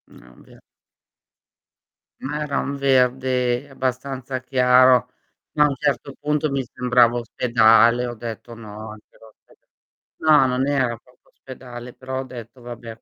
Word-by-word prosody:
Ah, 60 +1 -18
beh. - - -19 1.6
Ma 150 +3 -4
era 145 -2 -2
un 140 - -3
verde 130 -1 +1
abbastanza 130 0 -4
chiaro, 125 -1 +4 0.4
ma 150 - +4
a - - +4
un 140 - -3
certo 140 0 -2
punto 150 0 -1
mi 135 -1 -1
sembrava 125 -1 +2
ospedale, 120 0 +3
ho 120 - -5
detto: 115 +1 -8
"No, 110 -1 -10
anche 105 0 -16
l'ospeda" 110 -1 -22 0.5
no, 155 -3 +4
non 130 +2 -1
era 130 -5 0
proprio 125 +2 -28
ospedale, 125 -2 -11
però 130 0 -6
ho - - -3
detto: 125 -1 -11
"Vabbè, 120 -2 -9
125 Hz, 140 wpm, -22 LUFS, 120-135 Hz, 1.6 s, chiaro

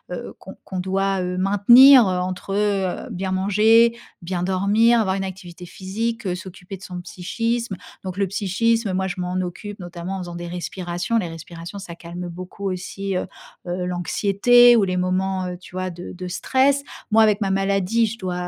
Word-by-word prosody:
heu, - - -7
qu'on - - -11
qu'on 190 - -5
doit, 195 0 0
heu, 180 0 -3
maintenir, 235 +8 +7
heu, 185 -1 0
entre, 185 +1 -4
heu, 200 -3 -1
bien 185 +1 -3
manger, 220 +5 +4 0.2
bien 175 0 -3
dormir, 205 +6 +3
avoir 190 -3 +1
une 195 - -2
activité 185 -2 -8
physique, 195 +1 -3
s'occuper 185 0 -9
de 190 - -14
son 180 -1 -7
psychisme. 230 +4 -3 0.3
Donc 185 0 -6
le 200 -1 +1
psychisme, 215 +3 0
moi 190 +1 -1
je 180 0 -4
m'en 180 0 -3
occupe 200 +3 -6
notamment 175 +1 -6
en - - -5
faisant 175 -1 -7
des 175 0 -6
respirations. 175 +3 -3
Les 185 -6 -1
respirations 165 +3 -9
ça 175 -3 -9
calme 175 +1 -7
beaucoup 185 +3 -6
aussi, 190 +1 -4
heu, 180 - -1 0.4
heu, 180 +1 -2
l'anxiété 200 +7 +4
ou 215 - +4
les 185 -1 -1
moments, 185 0 -1
heu, 180 - -5
tu 180 0 -15
vois, 185 0 -2
de 175 0 -8
de 180 0 -7
stress. 270 +9 +1 0.3
Moi 220 +1 +5
avec 210 -2 +3
ma 200 -3 -1
maladie, 195 +3 +1
je 225 +2 -6
dois 185 -3 -4
190 Hz, 185 wpm, -22 LUFS, 180-205 Hz, 0.4 s, maintenir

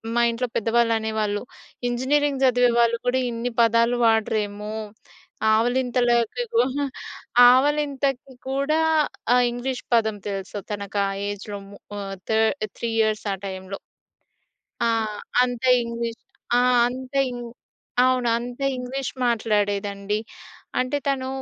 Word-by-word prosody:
మా 240 - +4
ఇంట్లో 240 +2 -2
పెద్దవాళ్ళు 230 +1 +2
అనేవాళ్ళు 215 -2 -1 0.5
ఇంజనీరింగ్ 270 +3 +1
చదివే 245 -1 +4
వాళ్ళు 235 0 +3
కూడా 255 +1 +2
ఇన్ని 235 +1 -3
పదాలు 230 +1 +3
వాడరేమో 210 -2 0 0.8
ఆవలింతలకి 245 - +1
కూడా 285 - +2 0.7
ఆవలింతకి 275 -1 +1 0.2
కూడా 280 +4 +1 0.5
ఆ - - +6 0.2
ఇంగ్లీష్ 250 +1 -4
పదం 220 -2 +2
తెలుసు 195 0 -4
తనకి 200 0 -3
ఆ - - -2 0.2
ఏజ్‌లో 205 0 -6
మూ 200 - -12 0.2
ఆ - - -4 0.3
థర్డ్ 220 +2 +2
3 235 - -2
ఇయర్‌స్ 215 0 0
ఆ - - -2
టైంలో. 190 +1 -6 1.1
ఆ! - - +3 0.6
అంతే 250 0 0
ఇంగ్లీష్ 235 -1 -4 0.4
ఆ! - - +5 0.3
అంతే 260 +2 -3
ఇం 245 - -6 0.6
అవును 255 -1 +2
అంత 245 +2 -6 0.2
ఇంగ్లీష్ 255 +2 -4
మాట్లాడేదండి. 205 -3 0 0.6
అంటే 255 +3 0
తను 265 -2 0
235 Hz, 115 wpm, -24 LUFS, 215-255 Hz, 1.1 s, ఆ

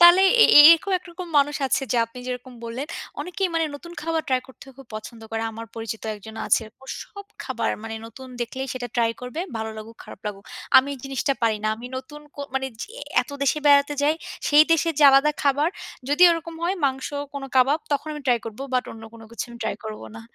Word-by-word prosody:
তাহলে 345 +2 +9 0.2
এ - - +9 0.3
এরকম 335 +4 +4
একরকম 355 0 -9
মানুষ 285 +1 +2
আছে 265 - +1
যে - - +1
আপনি 230 - -13
যেরকম 250 0 -6
বললেন, 240 +5 -5 0.3
অনেকেই 370 +1 -2
মানে 325 -1 +2
নতুন 340 +4 -10
খাবার 325 0 -1
ট্রাই 255 -1 +2
করতে 265 - -15
খুব 270 - -12
পছন্দ 220 +2 -8
করে। 225 0 -2
আমার 225 +1 -8
পরিচিত 225 -1 -5
একজন 220 +2 -11
আছে। 225 - +3 0.2
ও - - -13 0.2
সব 400 -1 -12 0.2
খাবার - - -1
মানে 225 - -5
নতুন 260 +4 -11
দেখলেই 260 +3 -4
সেটা 245 -1 -5
ট্রাই 230 -1 +3
করবে। 250 +6 -5 0.2
ভালো 220 0 -3
লাগুক, 220 +1 -10
খারাপ - - -12
লাগুক। 200 -1 -6 0.3
আমি 265 +2 +6
এই - - -11
জিনিসটা 270 +1 -1
পারি 220 -2 +3
না। - - +2
আমি 235 +2 -8
নতুন 295 +3 -8
কো - - -8
মানে 265 0 0 0.2
যে - - -7 0.3
এত - - -14
দেশে 280 +2 +2
বেড়াতে 285 0 +5
যাই, 300 +2 +3 0.3
সেই 295 +1 +8
দেশে 330 +1 +2
যে - - +3
আলাদা 275 +2 +5
খাবার। 285 +2 +3 0.4
যদি 295 +5 +3
ওরকম 330 0 -3
হয় 370 +3 0
মাংস 265 -1 -2 0.3
কোনো 275 -1 -5
কাবাব, 270 +4 +4
তখন 290 +2 -1
আমি 300 - -6
ট্রাই 245 -2 +4
করব। 225 +1 -8
বাট 250 - +2
অন্য 225 - -12
কোনো 225 -1 -12
কিছু 230 - -3
আমি 235 - -11
ট্রাই - - -2
করব 215 -1 -6 0.2
না। 225 - -8
265 Hz, 215 wpm, -24 LUFS, 230-300 Hz, 0.4 s, তাহলে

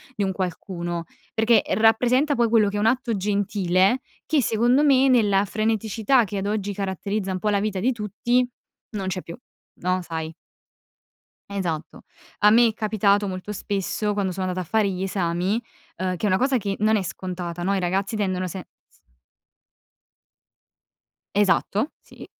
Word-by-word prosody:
di 205 - -1
un 190 - 0
qualcuno, 175 -2 -4 0.3
perché 225 +1 +4
rappresenta 245 +6 +3
poi 235 -2 +3
quello 220 -2 +4
che 205 - -4
è - - 0
un 210 - +1
atto 240 0 +1
gentile 200 +1 +1 0.3
che 310 -3 +2
secondo 240 +5 +3
me, 270 -2 +5
nella 205 -6 +4
freneticità 220 +3 +1
che 205 -1 -5
ad 195 - -2
oggi 205 -1 -2
caratterizza 195 +1 -3
un 185 - -3
po' 210 - 0
la 205 -1 +2
vita 200 -2 -2
di 245 +7 +2
tutti, 235 +3 0 0.4
non 200 -4 -4
c'è 185 0 -2
più, 170 - -9 0.5
no, 185 +1 0
sai. 160 -2 -5 1.2
Esatto. 175 -6 -4 0.4
A 210 - +6
me 235 +2 +6
è 225 - -1
capitato 205 -2 +1
molto 185 +2 -5
spesso, 205 +1 -2
quando 200 -2 -1
sono 185 +1 -3
andata 185 0 -3
a - - -24
fare 220 -2 +2
gli 185 0 -3
esami, 185 +3 -1 0.4
ehm, 185 0 -1
che 180 - -3
è - - +3
una 185 - +3
cosa 260 +3 +2
che 200 -3 -2
non 215 +1 +3
è 205 - 0
scontata, 180 -2 -5
no, 195 +2 +1
i - - 0
ragazzi 190 +4 -1
tendono 185 -3 -1
se 180 +1 -7 0.2
s - - -29 2.4
Esatto, 205 - +1
sì, - - -13
200 Hz, 170 wpm, -24 LUFS, 185-220 Hz, 2.4 s, A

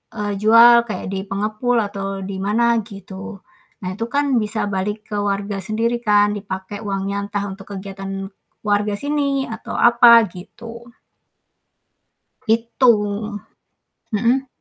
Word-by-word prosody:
eee, 205 -2 -2
jual 235 +2 +7
kayak 215 - -5
di 195 0 -4
pengepul 215 +5 -1
atau 195 -1 -5
di 190 0 -5
mana, 230 +4 +2
gitu. 200 -1 -9 0.4
Nah, 180 - -3
itu 225 +3 -3
kan 285 -1 +1
bisa 215 0 -1
balik 205 +2 -3
ke - - -2
warga 200 0 -2
sendiri 230 +4 -1
kan, 205 -1 +4
dipakai 195 0 -6
uangnya 200 0 -3
entah 205 0 -3
untuk 195 +1 -10
kegiatan 195 0 -6 0.4
warga 205 0 +1
sini, 280 -2 -1
atau 225 0 -7
apa, 235 0 +7
gitu. 230 +6 -11 1.6
Gitu, 230 +2 +3 1.2
mhm? 235 +5 +1
210 Hz, 125 wpm, -20 LUFS, 195-235 Hz, 1.6 s, jual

